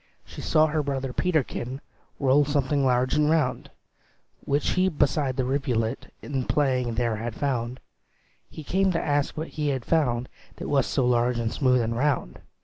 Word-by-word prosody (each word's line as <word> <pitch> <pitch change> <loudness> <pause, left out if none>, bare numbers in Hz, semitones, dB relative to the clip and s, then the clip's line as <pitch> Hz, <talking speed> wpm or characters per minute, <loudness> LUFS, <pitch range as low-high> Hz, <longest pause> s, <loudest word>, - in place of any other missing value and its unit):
She - - -9
saw 155 0 +3
her 155 0 0
brother 135 -2 -3
Peterkin 135 -7 -1 0.4
Roll 140 +1 +4
something 145 -1 0
large 125 0 +2
and 150 0 +3
round, 140 -3 0 0.7
Which 145 +1 0
he 185 +1 +2
beside 145 -4 0
the 130 - +1
rivulet 125 -3 -1
In 135 -3 -3
playing 130 -5 +1
there 115 -2 0
had 115 +1 -5
found; 125 -3 -2 0.7
He 155 - -9
came 190 +5 +1
to 165 - +1
ask 145 0 -1
what 160 +2 -4
he 150 -1 -3
had 135 -4 -1
found, 125 -7 +1 0.3
That - - -6
was 140 -3 +2
so 130 - +1
large 120 0 +2
and 115 -1 -1
smooth 125 -3 +3
and 115 0 -1
round. 135 - -1
135 Hz, 170 wpm, -26 LUFS, 125-150 Hz, 0.7 s, Roll